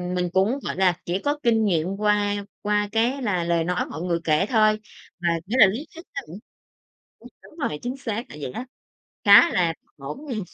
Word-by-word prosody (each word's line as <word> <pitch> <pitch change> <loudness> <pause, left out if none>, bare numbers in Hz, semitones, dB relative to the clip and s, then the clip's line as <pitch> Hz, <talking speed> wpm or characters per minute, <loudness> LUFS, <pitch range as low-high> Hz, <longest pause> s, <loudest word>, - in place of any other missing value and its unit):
mình 180 -1 0
cũng 210 +9 +2
gọi - - -3
là 185 -2 +3
chỉ 175 +2 -1
có 290 +7 -1
kinh 225 -2 +3
nghiệm 170 -3 +1
qua 205 -1 +1 0.2
qua 210 0 0
cái 240 +5 +1
là 185 -6 0
lời 170 -1 +1
nói 180 +2 -1
mọi 160 - -7
người 170 -2 0
kể 155 +4 +2
thôi, 215 -2 +3 0.4
mà 175 -1 0 0.2
nghĩa 235 +7 -2
là 210 - +10
lý 240 +11 -4
thuyết 335 - -10
nó - - -2
cũng 170 +6 -9 0.8
ừm, - - -13 0.2
đúng 315 - -17
rồi, 150 - -6
chính 250 +2 -4
xác 230 -2 -4
là - - -10
vậy 130 - -4
á, 250 - -6 0.6
khá 340 - +9
là 170 -3 +2 0.2
ngổn 150 - -8
ngang. 240 -6 -3
205 Hz, 210 wpm, -24 LUFS, 175-230 Hz, 0.8 s, là